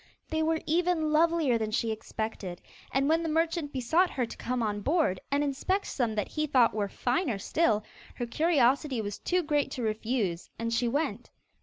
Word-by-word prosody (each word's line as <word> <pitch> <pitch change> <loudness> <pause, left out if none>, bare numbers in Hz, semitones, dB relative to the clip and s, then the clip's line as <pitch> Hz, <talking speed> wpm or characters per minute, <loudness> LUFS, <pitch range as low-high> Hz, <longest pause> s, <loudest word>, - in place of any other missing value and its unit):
They 315 0 +1
were 320 0 +1
even 330 -1 +1
lovelier 315 -6 +3
than 220 -1 -1
she 225 +1 0
expected, 220 -4 -5 0.3
and 275 +1 +2
when 325 +2 +3
the 330 - -2
merchant 325 -1 0
besought 315 +8 +2
her 250 - -1
to - - -9
come 250 -1 -2
on 205 -1 -1
board, 290 - +1
and 280 +1 +1
inspect 295 +8 0
some 235 -5 -1
that 210 - -1
he 305 0 -1
thought 255 -5 +4
were 205 -2 -1
finer 245 - 0
still, 215 - +1 0.3
her 240 - -3
curiosity 275 -1 +2
was 205 -2 -4
too 360 0 0
great 295 -2 +1
to 250 - -4
refuse, 215 -5 -1
and 230 0 -2
she 240 +1 +1
went. 245 -3 -1
265 Hz, 185 wpm, -29 LUFS, 225-315 Hz, 0.3 s, thought